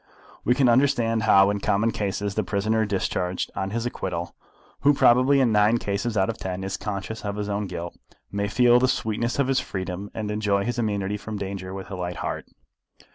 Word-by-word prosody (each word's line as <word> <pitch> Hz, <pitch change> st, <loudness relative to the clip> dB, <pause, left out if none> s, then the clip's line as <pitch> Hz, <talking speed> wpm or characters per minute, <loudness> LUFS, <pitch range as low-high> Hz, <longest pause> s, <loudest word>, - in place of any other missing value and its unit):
We 125 Hz, -, +3 dB
can 135 Hz, -1 st, +3 dB
understand 120 Hz, -3 st, +3 dB
how 100 Hz, -2 st, +5 dB
in 100 Hz, -, -2 dB
common 105 Hz, +3 st, +1 dB
cases 100 Hz, -1 st, -2 dB
the 110 Hz, -, 0 dB
prisoner 110 Hz, +4 st, 0 dB
discharged 90 Hz, -2 st, -2 dB
on 95 Hz, -, -2 dB
his 115 Hz, +3 st, -2 dB
acquittal, 90 Hz, -7 st, -4 dB, 0.5 s
who 145 Hz, +1 st, +4 dB
probably 130 Hz, +3 st, +5 dB
in 125 Hz, -4 st, +3 dB
nine 105 Hz, +2 st, +4 dB
cases 105 Hz, +2 st, -2 dB
out 95 Hz, -1 st, +3 dB
of 115 Hz, -, -4 dB
ten 95 Hz, 0 st, -4 dB
is 95 Hz, 0 st, -3 dB
conscious 105 Hz, +2 st, -5 dB
of 100 Hz, -1 st, -3 dB
his 105 Hz, 0 st, -3 dB
own 100 Hz, 0 st, -2 dB
guilt, 85 Hz, -1 st, -6 dB, 0.4 s
may 100 Hz, 0 st, -1 dB
feel 120 Hz, +3 st, +5 dB
the 130 Hz, -, +3 dB
sweetness 115 Hz, -1 st, -1 dB
of 140 Hz, -2 st, +2 dB
his 135 Hz, -1 st, +2 dB
freedom 95 Hz, +1 st, -5 dB
and 110 Hz, -1 st, -3 dB
enjoy 105 Hz, -2 st, +1 dB
his 120 Hz, 0 st, -2 dB
immunity 105 Hz, -2 st, -1 dB
from 105 Hz, +1 st, -6 dB
danger 95 Hz, -2 st, -5 dB
with 95 Hz, +1 st, -7 dB
a -, -, -3 dB
light 90 Hz, -1 st, -4 dB
heart. -, -, -4 dB
105 Hz, 200 wpm, -25 LUFS, 95-115 Hz, 0.5 s, how